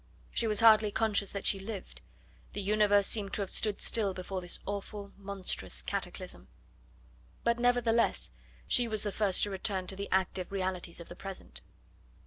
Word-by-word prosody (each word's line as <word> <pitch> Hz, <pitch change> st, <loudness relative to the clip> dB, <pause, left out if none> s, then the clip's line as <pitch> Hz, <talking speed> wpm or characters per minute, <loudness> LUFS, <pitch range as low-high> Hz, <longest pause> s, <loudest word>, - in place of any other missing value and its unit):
She 230 Hz, -, 0 dB
was 210 Hz, -1 st, +3 dB
hardly 220 Hz, -2 st, +7 dB
conscious 205 Hz, -2 st, 0 dB
that 200 Hz, -, -5 dB
she 195 Hz, -, +4 dB
lived; 195 Hz, -1 st, -8 dB, 0.5 s
the 205 Hz, -, -3 dB
universe 205 Hz, 0 st, +4 dB
seemed 200 Hz, -2 st, +4 dB
to 205 Hz, -, +2 dB
have 190 Hz, -, -4 dB
stood 210 Hz, -2 st, 0 dB
still 200 Hz, -5 st, +3 dB
before 185 Hz, 0 st, -4 dB
this 175 Hz, 0 st, -1 dB
awful, 200 Hz, 0 st, -5 dB
monstrous 195 Hz, -, -2 dB
cataclysm. -, -, -4 dB, 1.0 s
But, 235 Hz, 0 st, +1 dB
nevertheless, 240 Hz, -1 st, +2 dB, 0.4 s
she 245 Hz, -2 st, +3 dB
was 215 Hz, -2 st, +1 dB
the 205 Hz, -, -2 dB
first 200 Hz, -2 st, +2 dB
to 205 Hz, -, 0 dB
return 190 Hz, -1 st, -2 dB
to 190 Hz, -, -3 dB
the 200 Hz, +1 st, -5 dB
active 190 Hz, -1 st, 0 dB
realities 185 Hz, -3 st, -2 dB
of 170 Hz, -, -10 dB
the 175 Hz, -, -10 dB
present. 180 Hz, -, -8 dB
200 Hz, 165 wpm, -31 LUFS, 190-215 Hz, 1.0 s, hardly